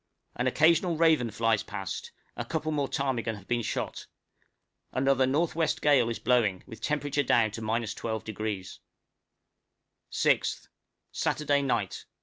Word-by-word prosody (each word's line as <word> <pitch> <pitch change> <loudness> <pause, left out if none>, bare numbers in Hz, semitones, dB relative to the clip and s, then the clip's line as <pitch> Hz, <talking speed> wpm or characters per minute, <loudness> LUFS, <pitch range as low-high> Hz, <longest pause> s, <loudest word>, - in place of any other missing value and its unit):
An 125 - 0
occasional 165 +5 +3
raven 160 -7 +4
flies 110 -1 +1
past, 95 -4 -6 0.2
a - - -3
couple 155 -1 -2
more 145 -2 0
ptarmigan 130 -4 -1
have 100 -2 -13
been 120 -1 +1
shot: - - -4 0.8
another 135 0 +3
N.W. 160 +4 +1
gale 135 -6 +4
is 115 - -2
blowing, 110 -6 +2
with 110 - -11
temperature 145 -1 0
down 115 -5 +3
to 115 - -6
12°. 110 -3 -3 1.3
_6th. - - +1 0.4
Saturday 145 -2 +1
Night. 135 -2 -1
125 Hz, 125 wpm, -28 LUFS, 110-145 Hz, 1.3 s, raven